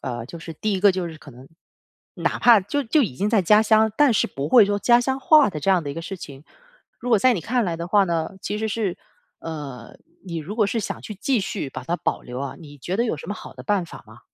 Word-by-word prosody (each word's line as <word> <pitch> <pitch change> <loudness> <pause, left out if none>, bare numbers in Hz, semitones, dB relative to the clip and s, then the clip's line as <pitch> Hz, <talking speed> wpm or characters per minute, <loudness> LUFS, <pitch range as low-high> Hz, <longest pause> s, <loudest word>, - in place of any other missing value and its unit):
呃， 120 -2 -5
就 170 - -9
是 165 0 -8
第 215 +6 -2
一 190 - -1
个 200 -1 +6
就 185 -2 -2
是 160 -2 -9
可 145 - -13
能 130 +2 -14 0.7
哪 - - -2
怕 235 -4 +6
就 245 +10 -2
就 280 +4 +2
已 190 - -2
经 205 - 0
在 215 -5 +3
家 210 +5 +5
乡， 220 0 +3
但 290 -3 +5
是 - - +2
不 140 +2 -5
会 230 +1 +7
说 205 0 -1
家 240 +3 +5
乡 265 +2 -2
话 300 -4 +5
的 155 -5 -6
这 195 - +1
样 185 -3 +3
的 140 - -4
一 - - -7
个 165 - -5
事 195 +2 -6
情， 140 -4 -11 0.5
如 245 - -5
果 220 - +5
在 255 +2 +4
你 180 - -3
看 245 +4 0
来 170 -3 -2
的 170 +1 -5
话 200 +1 +4
呢， 170 +2 -2
其 210 - -3
实 220 0 -2
是 200 -4 -2 0.4
呃， 140 -7 -8 0.3
你 170 -3 -6
如 180 +8 -7
果 215 -3 +3
是 225 +2 -1
想 - - -5
去 210 - -7
继 230 +3 0
续 190 -6 -4
把 - - -8
它 170 - -1
保 - - -2
留 125 +2 -7
啊， 140 -1 -5
你 145 -3 -13
觉 180 +8 -3
得 235 - +1
有 225 - -1
什 - - -10
么 205 - -3
好 130 - -11
的 125 - -10
办 190 +5 0
法 160 - -12
吗？ 110 +2 -16
195 Hz, 300 characters per minute, -23 LUFS, 155-220 Hz, 0.7 s, 会